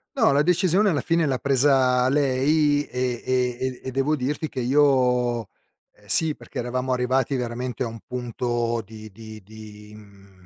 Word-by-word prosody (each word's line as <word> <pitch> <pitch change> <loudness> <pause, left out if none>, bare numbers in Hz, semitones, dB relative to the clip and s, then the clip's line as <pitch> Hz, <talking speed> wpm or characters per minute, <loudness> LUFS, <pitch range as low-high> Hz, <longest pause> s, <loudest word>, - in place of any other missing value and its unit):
No, 225 - +3
la 140 - +3
decisione 180 +5 +2
alla 145 -6 0
fine 165 0 +1
l'ha 135 -3 0
presa 130 -2 +2
lei 145 +2 +2
e 125 -1 -3
e 125 0 -1
e 130 - -5
devo 135 +4 0
dirti 145 +3 -3
che - - -6
io 125 -3 +2 0.5
ehm, 105 - -26
sì 155 - +1
perché - - -9
eravamo 125 +2 -2
arrivati 130 +2 0
veramente 125 +1 -3
a 120 - -2
un 115 0 -8
punto 120 -1 -2
di 110 +1 -12
di 110 +1 -11
di 105 0 -13
mhmm, 100 -3 -18
125 Hz, 160 wpm, -23 LUFS, 120-140 Hz, 0.5 s, No